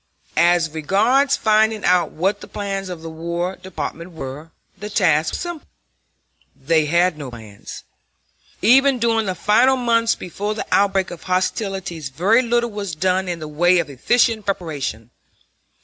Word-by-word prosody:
As 170 Hz, 0 st, +3 dB
regards 225 Hz, -, +2 dB
finding 220 Hz, -1 st, +2 dB
out 180 Hz, -1 st, +3 dB
what 190 Hz, +6 st, -1 dB
the -, -, -10 dB
plans 195 Hz, -2 st, -4 dB
of 170 Hz, -3 st, -7 dB
the 165 Hz, -, -6 dB
War 170 Hz, +3 st, -3 dB
Department 180 Hz, -2 st, -7 dB
were, 150 Hz, +1 st, -8 dB, 0.3 s
the 210 Hz, +2 st, -7 dB
task 160 Hz, -7 st, +2 dB
was -, -, -3 dB
simple. 345 Hz, -3 st, -6 dB, 0.9 s
They 155 Hz, +2 st, +1 dB
had 170 Hz, 0 st, +2 dB
no 140 Hz, -3 st, -6 dB
plans. 110 Hz, -4 st, -11 dB, 0.8 s
Even 270 Hz, +4 st, +5 dB
during 225 Hz, -2 st, +1 dB
the 185 Hz, -, -2 dB
final 235 Hz, +9 st, +3 dB
months 230 Hz, -2 st, +2 dB
before 205 Hz, +4 st, -4 dB
the -, -, -4 dB
outbreak 195 Hz, -2 st, +2 dB
of 175 Hz, -, -9 dB
hostilities 185 Hz, -4 st, -2 dB
very 190 Hz, -, +3 dB
little 240 Hz, -1 st, 0 dB
was 200 Hz, -5 st, -5 dB
done 185 Hz, +3 st, 0 dB
in 175 Hz, -1 st, -3 dB
the 155 Hz, -2 st, -7 dB
way 175 Hz, +4 st, +3 dB
of 165 Hz, -4 st, -1 dB
efficient 225 Hz, -, +1 dB
preparation. 145 Hz, -, -4 dB
185 Hz, 150 wpm, -20 LUFS, 160-215 Hz, 0.9 s, Even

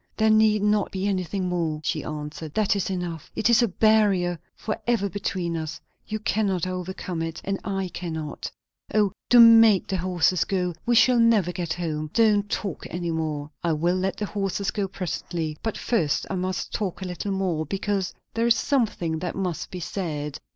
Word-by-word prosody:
"There 220 Hz, 0 st, +4 dB
need 215 Hz, -1 st, +4 dB
not 210 Hz, -1 st, +2 dB
be 190 Hz, 0 st, -3 dB
anything 190 Hz, -1 st, -1 dB
more," 165 Hz, -4 st, -1 dB
she -, -, -1 dB
answered. 150 Hz, 0 st, -6 dB
"That 210 Hz, -2 st, +2 dB
is 195 Hz, -, -1 dB
enough. 175 Hz, -4 st, -4 dB
It 225 Hz, -, +2 dB
is 235 Hz, -, +6 dB
a 235 Hz, -, +3 dB
barrier 195 Hz, -4 st, +3 dB, 0.2 s
for 215 Hz, -, -3 dB
ever 230 Hz, -4 st, +2 dB
between 180 Hz, -3 st, -3 dB
us; 160 Hz, -2 st, -4 dB, 0.3 s
you 215 Hz, -, -2 dB
cannot 205 Hz, -5 st, 0 dB
overcome 185 Hz, -1 st, -4 dB
it 165 Hz, 0 st, -4 dB
and 195 Hz, 0 st, -2 dB
I 195 Hz, -2 st, -2 dB
cannot. 160 Hz, -4 st, -5 dB, 0.4 s
O, 210 Hz, -2 st, +4 dB, 0.2 s
do 245 Hz, -, +7 dB
make 225 Hz, -4 st, +8 dB
the 190 Hz, -, -2 dB
horses 180 Hz, 0 st, +2 dB
go! 180 Hz, -2 st, -1 dB
we 240 Hz, -, +4 dB
shall 245 Hz, +1 st, +5 dB
never 225 Hz, -6 st, +4 dB
get 175 Hz, -2 st, -3 dB
home! 155 Hz, -3 st, -3 dB
and 150 Hz, -, -12 dB
don't 210 Hz, -3 st, +3 dB
talk 195 Hz, -5 st, -3 dB
any 175 Hz, 0 st, -3 dB
more." 155 Hz, -2 st, -3 dB
"I 170 Hz, -2 st, +2 dB
will 170 Hz, +4 st, +1 dB
let 190 Hz, +1 st, -1 dB
the 210 Hz, -, -2 dB
horses 195 Hz, -1 st, -2 dB
go 200 Hz, -2 st, -1 dB
presently; 170 Hz, -4 st, -4 dB
but 225 Hz, -, -2 dB
first 160 Hz, -12 st, 0 dB
I -, -, -1 dB
must 185 Hz, +1 st, -3 dB
talk 195 Hz, -2 st, -3 dB
a -, -, -4 dB
little 180 Hz, +3 st, -4 dB
more, 180 Hz, -5 st, -1 dB
because 195 Hz, +1 st, -1 dB, 0.2 s
there 230 Hz, +1 st, +1 dB
is 235 Hz, -, +5 dB
something 205 Hz, -, 0 dB
that 175 Hz, 0 st, -4 dB
must 185 Hz, -4 st, -3 dB
be 180 Hz, -, -6 dB
said. 150 Hz, -5 st, -4 dB
185 Hz, 190 wpm, -25 LUFS, 170-210 Hz, 0.4 s, make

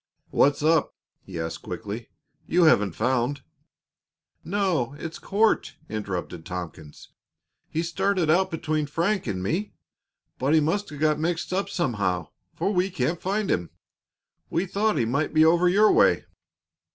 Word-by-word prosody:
"What's 145 Hz, +1 st, +3 dB
up?" 160 Hz, -1 st, +2 dB, 0.3 s
he 90 Hz, -3 st, -8 dB
asked 80 Hz, 0 st, -4 dB
quickly. -, -, -6 dB, 0.4 s
"You 175 Hz, +1 st, +3 dB
haven't 105 Hz, -, +4 dB
found 130 Hz, +3 st, 0 dB, 0.5 s
" -, -, -55 dB
"No; 165 Hz, -11 st, +1 dB
it's 165 Hz, +1 st, -7 dB
Court," 215 Hz, +3 st, +1 dB
interrupted 95 Hz, -5 st, -4 dB
Tompkins. 85 Hz, -4 st, -8 dB, 0.6 s
"He 160 Hz, -, -1 dB
started 185 Hz, +1 st, 0 dB
out 175 Hz, +5 st, +3 dB
between 155 Hz, -2 st, -2 dB
Frank 175 Hz, +4 st, 0 dB
and 95 Hz, -3 st, -2 dB
me, 180 Hz, -, -2 dB, 0.7 s
but 140 Hz, +5 st, +2 dB
he -, -, +6 dB
must 195 Hz, +7 st, 0 dB
have 150 Hz, -, -9 dB
got 155 Hz, 0 st, +2 dB
mixed 170 Hz, +2 st, -2 dB
up 195 Hz, +1 st, -1 dB
somehow, 100 Hz, -, -1 dB, 0.3 s
for 200 Hz, -, 0 dB
we 185 Hz, +1 st, +1 dB
can't 175 Hz, -2 st, -1 dB
find 200 Hz, +2 st, -1 dB
him. 85 Hz, -1 st, -1 dB, 0.8 s
We 170 Hz, +3 st, 0 dB
thought 210 Hz, +3 st, 0 dB
he 115 Hz, -, +2 dB
might 140 Hz, +7 st, -1 dB
be 155 Hz, 0 st, +6 dB
over 175 Hz, +2 st, +4 dB
your 210 Hz, +4 st, +5 dB
way." -, -, +4 dB
155 Hz, 150 wpm, -25 LUFS, 120-185 Hz, 0.8 s, he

